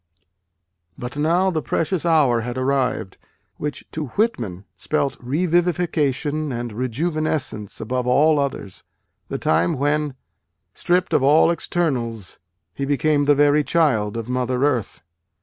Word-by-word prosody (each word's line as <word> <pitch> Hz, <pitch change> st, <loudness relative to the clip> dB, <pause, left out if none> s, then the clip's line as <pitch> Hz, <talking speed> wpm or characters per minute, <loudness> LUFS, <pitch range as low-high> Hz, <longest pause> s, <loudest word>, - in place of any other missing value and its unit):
But 125 Hz, +2 st, -6 dB
now 170 Hz, +6 st, +2 dB
the 160 Hz, -3 st, -1 dB
precious 165 Hz, +3 st, -1 dB
hour 140 Hz, -8 st, +3 dB
had 120 Hz, +2 st, -5 dB
arrived, 130 Hz, -6 st, -1 dB, 0.4 s
which 150 Hz, 0 st, -5 dB
to 155 Hz, -2 st, -4 dB
Whitman 115 Hz, -, -1 dB
spelt 145 Hz, -3 st, -1 dB
revivification 155 Hz, -1 st, 0 dB
and 120 Hz, -2 st, -4 dB
rejuvenescence 130 Hz, -, -2 dB
above 125 Hz, +2 st, -2 dB
all 150 Hz, +4 st, +4 dB
others: 135 Hz, -9 st, -4 dB, 0.4 s
the -, -, -3 dB
time 85 Hz, +7 st, +1 dB
when, 145 Hz, 0 st, 0 dB, 0.6 s
stripped 180 Hz, +1 st, 0 dB
of -, -, +4 dB
all 150 Hz, +5 st, +5 dB
externals, 125 Hz, -, -2 dB, 0.3 s
he 140 Hz, -, -5 dB
became 145 Hz, +1 st, +1 dB
the 145 Hz, 0 st, +5 dB
very 145 Hz, +1 st, +4 dB
child 125 Hz, -9 st, +1 dB
of 115 Hz, -1 st, -5 dB
Mother 125 Hz, +1 st, -1 dB
Earth. 125 Hz, -8 st, -1 dB
145 Hz, 125 wpm, -22 LUFS, 125-155 Hz, 0.6 s, all